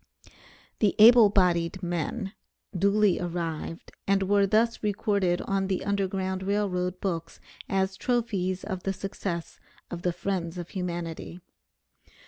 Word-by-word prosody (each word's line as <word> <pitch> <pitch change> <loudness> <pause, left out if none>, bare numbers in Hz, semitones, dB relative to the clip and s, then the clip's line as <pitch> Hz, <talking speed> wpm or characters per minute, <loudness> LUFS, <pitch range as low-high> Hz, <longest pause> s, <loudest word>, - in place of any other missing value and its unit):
The 210 -3 +2
"able 230 0 +9
bodied 180 -1 +1
men" 175 +4 -3 0.4
duly 200 +1 +3
arrived, 170 -2 -4 0.2
and 195 0 +3
were 200 +1 +3
thus 225 +3 +2
recorded 200 -4 0
on 195 -1 0
the 190 -1 -2
Underground 190 -2 -1
Rail 200 +2 0
Road 180 0 -2
books 170 -4 -3 0.3
as 190 0 0
trophies 200 -7 -1
of 190 -3 -4
the 195 - -1
success 190 -3 -5 0.3
of 175 - -5
the 180 - +1
friends 175 -1 -3
of 175 -1 -6
humanity. 175 -2 -5
190 Hz, 125 wpm, -27 LUFS, 175-200 Hz, 0.4 s, able